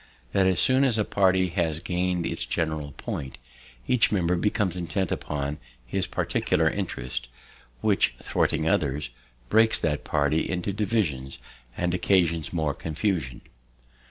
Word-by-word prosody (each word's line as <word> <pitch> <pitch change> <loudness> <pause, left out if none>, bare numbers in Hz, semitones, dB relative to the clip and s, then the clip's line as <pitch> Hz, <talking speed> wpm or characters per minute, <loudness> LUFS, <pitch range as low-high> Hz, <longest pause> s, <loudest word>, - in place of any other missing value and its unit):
"That 95 -1 +3
as 95 -2 +2
soon 130 +1 +4
as 125 -5 +2
a 105 - +1
party 95 -2 +3
has 80 -3 0
gain'd 90 +1 -1
its - - 0
general 80 -3 -2
point, 65 0 -5 0.5
each 125 -3 +3
member 90 -3 +2
becomes 95 0 0
intent 90 +1 -2
upon 75 0 -3 0.3
his - - -1
particular 80 +1 +1
interest; 65 -10 -3 0.5
which, - - +2
thwarting 80 - 0
others, 75 -4 0 0.4
breaks 110 +1 +4
that 75 -3 0
party 75 +1 +1
into 90 +2 -2
divisions, 95 - -1 0.4
and 90 0 0
occasions 85 -4 +2
more 80 -4 0
confusion. 80 - -2
85 Hz, 130 wpm, -26 LUFS, 75-95 Hz, 0.5 s, soon